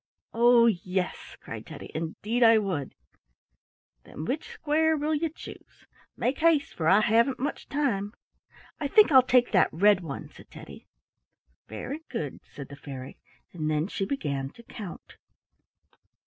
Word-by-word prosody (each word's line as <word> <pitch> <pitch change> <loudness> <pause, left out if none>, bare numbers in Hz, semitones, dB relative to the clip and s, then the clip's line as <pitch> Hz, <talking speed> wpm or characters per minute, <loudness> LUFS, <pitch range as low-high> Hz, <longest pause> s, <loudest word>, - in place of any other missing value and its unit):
"Oh, 235 0 +5
yes!" 185 -3 -2
cried - - -9
Teddy. - - -10
"Indeed, 205 +9 -3
I 225 -1 +7
would." 185 -10 -2 1.1
"Then 155 - -8
which 285 - -3
square 315 +1 +1
will 300 +2 -1
you 315 +2 0
choose? 315 - -13 0.3
Make 260 +2 -1
haste, 315 -3 +2
for 160 - -2
I 195 +5 +6
haven't 230 +5 +3
much 280 +4 -4
time." 230 -8 -1 0.6
"I 290 - -1
think 420 +5 +5
I'll 260 -2 +9
take 250 -1 +3
that 185 -4 +4
red 200 +4 +4
one," 150 -5 -6
said - - -16
Teddy. - - -12 0.8
"Very 265 - -6
good," 145 -3 -4
said 140 - -9
the 140 - -9
fairy, 135 -2 -9 0.3
and 155 -3 -2
then 155 +2 0
she 195 - -3
began 140 - -3
to 235 - -15
count. 205 -6 -10
215 Hz, 145 wpm, -27 LUFS, -, 1.1 s, I'll